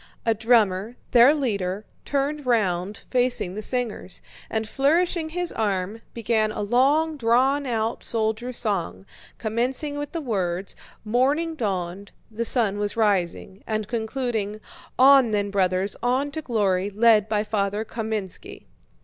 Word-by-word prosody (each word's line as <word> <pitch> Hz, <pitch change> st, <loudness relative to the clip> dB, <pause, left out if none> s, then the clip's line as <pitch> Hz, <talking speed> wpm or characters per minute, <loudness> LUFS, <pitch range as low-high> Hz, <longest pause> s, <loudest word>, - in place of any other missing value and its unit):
A 225 Hz, -, +3 dB
drummer, 220 Hz, -1 st, +2 dB, 0.2 s
their 245 Hz, +3 st, +7 dB
leader, 210 Hz, -9 st, -2 dB, 0.2 s
turned 285 Hz, 0 st, -2 dB
round 200 Hz, -4 st, 0 dB
facing 245 Hz, -7 st, +1 dB
the 215 Hz, -, -5 dB
singers, 235 Hz, -5 st, -3 dB, 0.3 s
and 220 Hz, -1 st, -2 dB
flourishing 320 Hz, -, +1 dB
his 355 Hz, +1 st, -1 dB
arm, 205 Hz, 0 st, -2 dB
began 220 Hz, -2 st, +1 dB
a 210 Hz, -, -3 dB
long 285 Hz, +8 st, +2 dB
drawn 265 Hz, +4 st, +2 dB
out 225 Hz, -1 st, -2 dB
soldiers' 225 Hz, +2 st, -2 dB
song, 170 Hz, -, -2 dB, 0.3 s
commencing 255 Hz, +6 st, -2 dB
with 290 Hz, -1 st, -5 dB
the 335 Hz, -, -3 dB
words: 195 Hz, -, -2 dB, 0.3 s
"Morning 275 Hz, +9 st, +1 dB
dawned, 195 Hz, -, -3 dB, 0.2 s
the 230 Hz, +2 st, -2 dB
sun 215 Hz, -5 st, +2 dB
was 205 Hz, +2 st, -2 dB
rising," 195 Hz, -2 st, 0 dB
and 215 Hz, -2 st, -2 dB
concluding: 220 Hz, -2 st, -2 dB, 0.4 s
"On 270 Hz, -1 st, +7 dB
then, 205 Hz, -1 st, -1 dB
brothers, 190 Hz, 0 st, +1 dB
on 260 Hz, +4 st, 0 dB
to 315 Hz, -, -4 dB
glory, 200 Hz, -7 st, 0 dB
led 215 Hz, 0 st, +4 dB
by 210 Hz, -1 st, +1 dB
Father 210 Hz, 0 st, -1 dB
Kámenski." 220 Hz, -5 st, -5 dB
220 Hz, 130 wpm, -24 LUFS, 205-255 Hz, 0.4 s, their